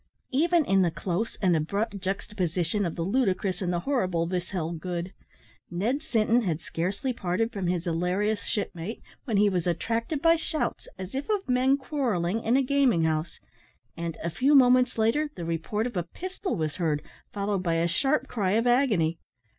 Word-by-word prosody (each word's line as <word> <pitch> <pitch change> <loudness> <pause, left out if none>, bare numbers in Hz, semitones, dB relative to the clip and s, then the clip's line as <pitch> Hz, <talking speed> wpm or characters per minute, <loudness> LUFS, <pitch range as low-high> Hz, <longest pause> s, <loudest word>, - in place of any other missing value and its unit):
Even 330 +4 +3
in 195 -3 +3
the 175 - +3
close 185 +6 -2
and 180 -3 +4
abrupt 200 +6 -1
juxtaposition 185 -1 -1
of 165 - -5
the 165 - -2
ludicrous 195 -3 0
and 180 -2 0
the 175 -1 -1
horrible 185 -10 0
this 180 0 -3
held 170 -3 -3
good. 180 +1 -4 0.6
Ned 220 +11 -1
Sinton 235 -5 +2
had 170 -8 -1
scarcely 195 +11 -2
parted 215 +2 -1
from 195 -4 -2
his 175 -1 0
hilarious 185 +5 0
shipmate, 205 -1 -4 0.2
when 225 -6 0
he 205 +1 +5
was 180 -3 0
attracted 230 - -1
by 330 +2 +5
shouts, 315 -1 -3
as 185 0 -7
if 275 +6 -4
of 415 -2 0
men 260 +2 +3
quarrelling, 230 - -1
in 235 +4 +3
a 275 - +3
gaming 260 -10 +3
house; 160 +1 -1 0.6
and, 165 -1 -4
a 170 - -1
few 265 - +3
moments 250 -2 +5
later, 230 +8 +2
the 170 - -5
report 170 +7 -1
of 245 -3 -4
a 175 - +1
pistol 370 - -5
was 155 -2 -2
heard, 155 -4 0 0.3
followed 200 -1 -1
by 170 -2 0
a 165 +1 +2
sharp 275 - +1
cry 200 -5 0
of 225 +2 +2
agony. 215 - +2
200 Hz, 180 wpm, -27 LUFS, 175-250 Hz, 0.6 s, he